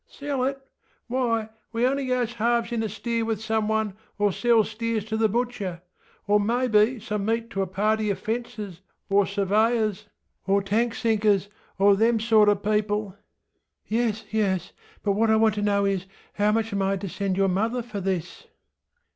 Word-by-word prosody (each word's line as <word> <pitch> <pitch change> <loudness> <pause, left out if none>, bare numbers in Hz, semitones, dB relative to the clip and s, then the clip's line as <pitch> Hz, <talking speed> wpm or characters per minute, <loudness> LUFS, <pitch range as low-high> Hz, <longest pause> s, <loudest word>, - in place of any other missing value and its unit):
ŌĆśSell 275 -2 -1
it? 270 -1 -10 0.4
Why, 235 -3 0 0.2
we 230 +1 +1
only 275 +1 0
goes 250 -2 0
halves 235 +1 0
in 235 -1 -1
a 220 - -2
steer 230 +3 -2
with 225 -2 -1
some 220 -1 -1
one, 220 -2 0 0.2
or 205 -1 +2
sells 225 +1 +2
steers 225 -1 -2
to 220 0 -3
the 220 0 +2
butcherŌĆöor 205 -3 -2
maybe 235 0 +2
some 210 -2 -3
meat 230 +2 -1
to 195 - -1
a 190 - -1
party 215 +3 0
of 200 - 0
fencers 215 -5 -5 0.3
or 200 0 +4
surveyors, 210 +1 +1 0.4
or 200 +1 +3
tank 225 +4 0
sinkers, 210 -4 +1 0.3
or 200 +1 +5
them 225 +2 +3
sorter 215 -2 +5
peopleŌĆöŌĆöŌĆÖ 210 0 -1 0.8
ŌĆśYes, 225 -1 0
yes; 190 -5 0 0.3
but 205 - +2
what 220 +3 +2
I 220 - +5
want 220 -1 +4
to 210 - -3
know 200 -1 +2
is, 195 -1 -1 0.3
how 205 +1 +2
much 225 0 0
am 200 - 0
I 195 0 +1
to 195 +1 -5
send 190 0 -2
your 195 0 +3
mother 225 +6 0
for 215 -4 -6
this? 190 - -3
215 Hz, 170 wpm, -25 LUFS, 200-230 Hz, 0.8 s, or